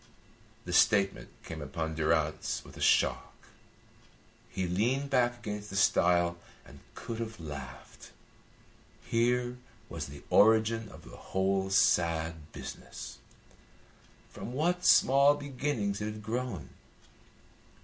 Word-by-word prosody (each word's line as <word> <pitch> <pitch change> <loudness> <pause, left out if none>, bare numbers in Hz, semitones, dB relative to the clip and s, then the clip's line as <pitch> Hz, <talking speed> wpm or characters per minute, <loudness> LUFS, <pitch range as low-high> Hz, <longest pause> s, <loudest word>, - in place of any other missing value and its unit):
The 90 - -5
statement 100 +1 +3
came 80 -1 -7
upon 80 +2 -4
Durrance 80 -1 0
with - - -13
a - - -10
shock. - - +2 1.1
He 95 - -3
leaned 125 +10 0
back 120 -2 +2
against 105 -3 -6
the 95 - -7
stile 85 -3 +3 0.3
and - - -14 0.2
could 115 -1 -6
have 115 -2 -5
laughed. 75 -3 -9 0.9
Here 120 +1 0 0.3
was - - -5
the 70 +1 -11
origin 110 +1 +4
of 80 0 -13
the - - -11
whole 95 0 -1
sad 80 -4 +1
business. - - -9 1.1
From 120 - -7
what 175 +6 0
small 140 +2 +6
beginnings 130 -8 -3
it - - -2
had 105 0 -6
grown! 115 - -4
105 Hz, 115 wpm, -30 LUFS, 85-120 Hz, 1.1 s, small